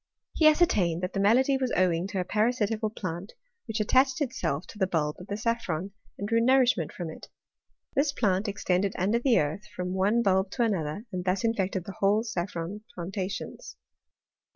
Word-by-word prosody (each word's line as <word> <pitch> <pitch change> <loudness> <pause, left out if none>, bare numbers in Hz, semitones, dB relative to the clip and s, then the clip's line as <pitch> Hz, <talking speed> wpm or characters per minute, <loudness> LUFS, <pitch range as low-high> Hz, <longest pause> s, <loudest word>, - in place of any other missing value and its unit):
He 315 - +5
ascertained 200 - +3
that 180 - -2
the 195 - -1
malady 255 +7 +4
was 255 -2 -1
owing 180 -1 +2
to 195 -1 -3
a - - +1
parasitical 220 +1 0
plant, 185 -2 -6 0.3
which 220 0 -2
attached 260 +6 +3
itself 255 - -2
to 210 - -11
the 190 - +2
bulb 150 -4 -1
of 180 - -10
the 205 - -3
saffron, 205 -6 -2 0.3
and 200 - -4
drew 230 +1 +2
nourishment 255 - +3
from 170 -3 -6
it. - - -12 0.6
This 280 +1 +2
plant 205 -6 +1
extended 195 -1 0
under 205 +6 +2
the 245 -1 +3
earth, 155 +7 -2
from 180 0 -3
one 205 +5 +2
bulb 190 -1 +2
to 245 - +1
another, 195 -2 -1
and 180 -1 -3
thus 185 +3 0
infected 195 -5 0
the 195 - -8
whole 205 +3 +3
saffron 185 -2 -4
plantations. 185 +2 -5
200 Hz, 175 wpm, -28 LUFS, 180-230 Hz, 0.6 s, He